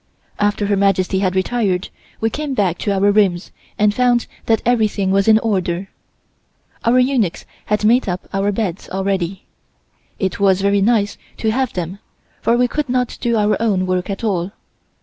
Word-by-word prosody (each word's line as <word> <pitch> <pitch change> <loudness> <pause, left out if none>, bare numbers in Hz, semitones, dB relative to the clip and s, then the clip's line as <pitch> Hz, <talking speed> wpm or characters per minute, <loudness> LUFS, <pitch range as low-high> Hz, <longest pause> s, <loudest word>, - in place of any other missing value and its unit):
After 205 0 +1
Her 200 0 +1
Majesty 195 -1 +1
had 185 -1 0
retired 190 -2 0 0.3
we 225 0 0
came 295 0 -3
back 185 -6 0
to 205 - -1
our 200 +1 +3
rooms 195 -4 +1 0.3
and 210 0 +3
found 245 0 +2 0.2
that 225 -1 +2
everything 215 -5 +1
was 195 +1 +2
in 220 -1 +7
order, 190 -4 -1 0.9
our 235 +2 +3
eunuchs 250 -8 +1 0.2
had 210 0 0
made 235 0 +3
up 180 +1 -4
our 195 +1 +1
beds 195 -4 -3
already. 190 -1 -2 0.7
It 190 -1 -2
was 195 -1 +3
very 200 0 +2
nice 205 -1 +1 0.2
to 220 - 0
have 260 +1 -1
them, 180 +2 -4 0.4
for 235 - +2
we 250 0 +3
could 295 +2 -3
not 250 -1 -1
do 235 -2 +1
our 210 0 +1
own 200 -5 +1
work 185 +1 -1
at 195 +3 -4
all. 195 -3 -1
205 Hz, 170 wpm, -18 LUFS, 190-230 Hz, 0.9 s, in